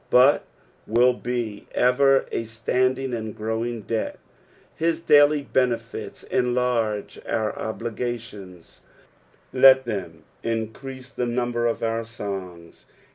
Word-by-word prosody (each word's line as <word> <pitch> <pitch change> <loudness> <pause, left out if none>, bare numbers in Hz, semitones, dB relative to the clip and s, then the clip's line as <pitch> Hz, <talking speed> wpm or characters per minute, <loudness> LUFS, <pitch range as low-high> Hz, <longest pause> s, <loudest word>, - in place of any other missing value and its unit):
but 130 +4 +5 0.4
will 120 +3 +4
be 120 -4 -4
ever 135 +2 +4
a - - -1
standing 130 +3 0
and 110 -2 -4
growing 110 +2 -2
debt. 110 +2 -2 0.6
His 165 0 0
daily 145 -2 +5
benefits 120 -4 -2
enlarge 120 -4 0
our 110 -1 -1
obligations, 110 -5 -6 0.7
let 130 0 +7
them 90 -8 -5 0.2
increase 125 +4 -4
the 125 - -2
number 120 0 0
of 115 - -2
our 115 0 0
songs. 95 -6 -8
120 Hz, 105 wpm, -24 LUFS, 110-125 Hz, 0.7 s, let